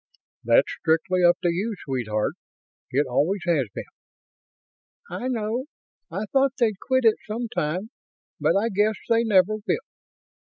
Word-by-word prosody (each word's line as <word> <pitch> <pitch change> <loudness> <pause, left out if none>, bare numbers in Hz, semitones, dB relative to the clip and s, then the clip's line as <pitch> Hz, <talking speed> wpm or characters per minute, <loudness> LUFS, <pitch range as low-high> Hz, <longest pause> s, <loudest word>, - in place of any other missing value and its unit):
"That's - - +3
strictly 175 +3 +1
up 175 0 +6
to 175 - +3
you, 200 +6 -1
sweetheart. 110 -6 -1 0.6
It 140 +3 +1
always 155 +10 0
has 155 -8 +2
been." - - -6 1.3
"I 185 +8 -3
know. 235 +1 -2 0.4
I 205 - -3
thought 270 -1 +3
they'd 220 -6 +1
quit 260 -2 +1
it 220 - +5
sometime, 215 -3 -3 0.5
but - - +2
I 220 +3 +1
guess 210 +1 +2
they 230 0 +4
never 210 -1 +3
will. 220 - -1
205 Hz, 135 wpm, -24 LUFS, 170-230 Hz, 1.3 s, up